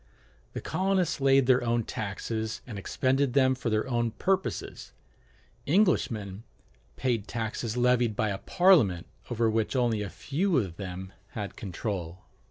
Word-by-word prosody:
The - - -4
colonists 185 -5 0
laid 135 -1 +5
their 125 -1 +4
own 120 0 +1
taxes 110 +2 -4
and 110 -5 -6
expended 130 +5 0
them 130 -1 +4
for 125 -2 -3
their 110 +3 0
own 120 -2 0
purposes: 190 - -2 0.7
Englishmen 115 - +1 0.5
paid 120 -5 -1
taxes 115 0 -3
levied 120 -2 +3
by 110 - 0
a 95 -1 -3
Parliament 155 - +4 0.2
over 115 -1 +1
which 110 +2 0
only 120 -4 +1
a 100 - -3
few 165 - 0
of 95 -9 -1
them 95 -1 -6 0.2
had 105 -3 -5
control. 95 -3 -5
115 Hz, 140 wpm, -28 LUFS, 105-135 Hz, 0.7 s, laid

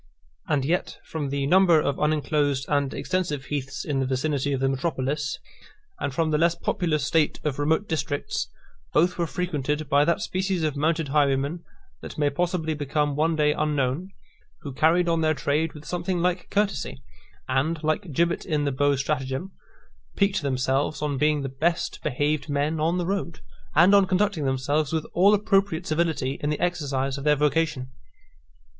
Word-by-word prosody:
And 140 -3 +1
yet, 175 +6 -1
from 150 -3 -4
the 140 0 -1
number 175 +1 +5
of 140 -2 -1
unenclosed 150 -2 +1
and 145 -2 +1
extensive 150 -2 -2
heaths 135 -2 -3
in 140 -3 -1
the 135 - 0
vicinity 140 +1 -1
of 135 - 0
the 135 - +1
metropolis, 135 0 -1 0.6
and 140 - -2
from 155 +3 0
the 150 - +2
less 170 +1 +3
populous 155 -6 -1
state 155 0 +1
of 145 -2 -2
remote 160 +7 +1
districts, 155 -3 -2 0.5
both 175 +3 +2
were 170 - +1
frequented 150 -4 -2
by 140 +1 +5
that 170 - +2
species 185 -2 -1
of 155 -2 0
mounted 155 +1 0
highwaymen, 140 +3 +1 0.4
that - - -9
may 145 -1 +2
possibly 165 +1 -1
become 145 0 -1
one 160 +2 +1
day 150 -1 +3
unknown, 150 +3 -1 0.5
who 140 - -7
carried 165 +5 +3
on 165 -1 +1
their 155 0 +2
trade 150 +3 0
with 150 0 -12
something 180 +1 -2
like 180 0 -1
courtesy; 200 -9 -1 0.4
and, 150 +5 0
like 155 +3 -1
Gibbet 170 +5 +1
in 150 -4 -1
the 140 - +1
Beaux 145 +2 +2
Stratagem, 135 +5 -2 0.6
piqued 200 -2 +2
themselves 135 +2 0
on 145 -3 -1
being 150 -1 +2
the - - -2
best 160 +6 -1
behaved 150 +2 -1
men 145 +2 0
on 165 +3 +1
the 175 - -1
road, 185 -3 -3 0.3
and 175 +6 +6
on 200 -1 +6
conducting 190 -4 +1
themselves 135 +3 0
with 160 -1 -1
all 200 +4 +5
appropriate 195 -4 +1
civility 155 -5 -1
in 150 - -1
the 150 - -1
exercise 140 -6 -1
of - - -7
their 150 0 +4
vocation. 150 -3 0
150 Hz, 170 wpm, -25 LUFS, 140-170 Hz, 0.6 s, and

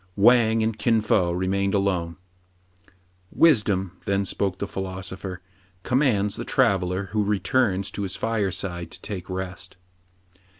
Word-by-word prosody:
Wang 110 +1 +5
and 110 -1 -2
Kin 115 -1 +3
Fo 95 -5 +2
remained 95 +3 0
alone. 90 -4 0 1.2
Wisdom," 105 - +3
then 100 0 0
spoke 95 0 -1
the - - -3
philosopher, 95 -1 -6 0.2
" 90 -1 -36
com 125 +2 +1
mands 105 -8 +1
the - - -4
traveller 95 0 +1
who 105 -1 +1
returns 105 -1 +1
to - - -5
his 95 -2 -3
fireside 95 -6 -2
to - - -8
take 95 -4 -6
rest." 95 0 -5
100 Hz, 135 wpm, -24 LUFS, 95-105 Hz, 1.2 s, Wang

